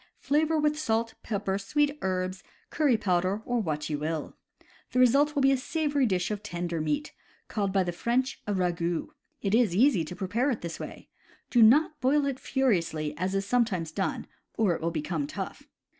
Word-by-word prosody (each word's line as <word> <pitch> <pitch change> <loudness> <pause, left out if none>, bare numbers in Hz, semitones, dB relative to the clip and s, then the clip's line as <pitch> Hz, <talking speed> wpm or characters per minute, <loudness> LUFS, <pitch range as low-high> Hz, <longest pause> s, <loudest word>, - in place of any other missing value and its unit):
Flavor 310 +3 +1
with 300 0 +1
salt, 225 -5 0
pepper, 200 -3 -2
sweet 290 +8 0
herbs, 185 0 -2 0.3
curry 290 -7 +3
powder 185 +1 0
or 245 -1 0
what 150 -5 -2
you 150 -2 -2
will. 155 0 -3 0.6
The 255 - +2
result 280 +5 +4
will 280 - +2
be 270 - +6
a 270 - +3
savory 290 -1 0
dish 185 -1 0
of 205 -1 -3
tender 175 -4 -3
meat, 290 - -2 0.3
called 200 -3 -1
by 190 -1 +2
the 175 - -2
French 245 +8 -1
a 205 - 0
ragout. 175 - -1 0.3
It 200 -1 0
is 225 -6 +3
easy 225 - +4
to 180 - -7
prepare 215 +10 0
it 240 - -2
this 170 -1 -6
way. - - -8 0.4
Do 240 - +5
not 295 +6 +5
boil 280 +3 +3
it 275 -2 -2
furiously 170 - 0
as 185 +4 -2
is 195 0 0
sometimes 200 -8 0
done, 190 +4 -2 0.3
or 210 -6 +3
it 160 - -5
will 165 - 0
become 155 -2 -2
tough. - - -6
205 Hz, 190 wpm, -28 LUFS, 175-265 Hz, 0.6 s, be